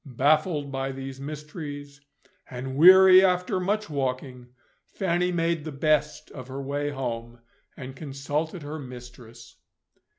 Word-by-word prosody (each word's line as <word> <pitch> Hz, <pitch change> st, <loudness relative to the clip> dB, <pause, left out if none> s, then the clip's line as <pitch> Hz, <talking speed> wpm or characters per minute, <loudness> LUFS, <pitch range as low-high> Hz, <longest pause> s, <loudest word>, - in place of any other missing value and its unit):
Baffled 150 Hz, +1 st, +1 dB
by 135 Hz, 0 st, -3 dB
these 135 Hz, 0 st, -8 dB
mysteries, 145 Hz, -1 st, -8 dB, 0.5 s
and 130 Hz, +1 st, -6 dB
weary 185 Hz, +4 st, +8 dB
after 180 Hz, 0 st, +1 dB
much 210 Hz, +3 st, -1 dB
walking, 130 Hz, -3 st, -4 dB, 0.4 s
Fanny 180 Hz, 0 st, -1 dB
made 165 Hz, -2 st, -1 dB
the 155 Hz, -, -6 dB
best 150 Hz, +1 st, 0 dB
of 130 Hz, -3 st, -9 dB
her 135 Hz, +1 st, -7 dB
way 145 Hz, +1 st, -3 dB
home, 120 Hz, -4 st, -5 dB, 0.4 s
and 130 Hz, 0 st, -8 dB
consulted 150 Hz, +4 st, -4 dB
her 150 Hz, +2 st, -6 dB
mistress. 120 Hz, -3 st, -12 dB
145 Hz, 125 wpm, -26 LUFS, 130-160 Hz, 0.5 s, weary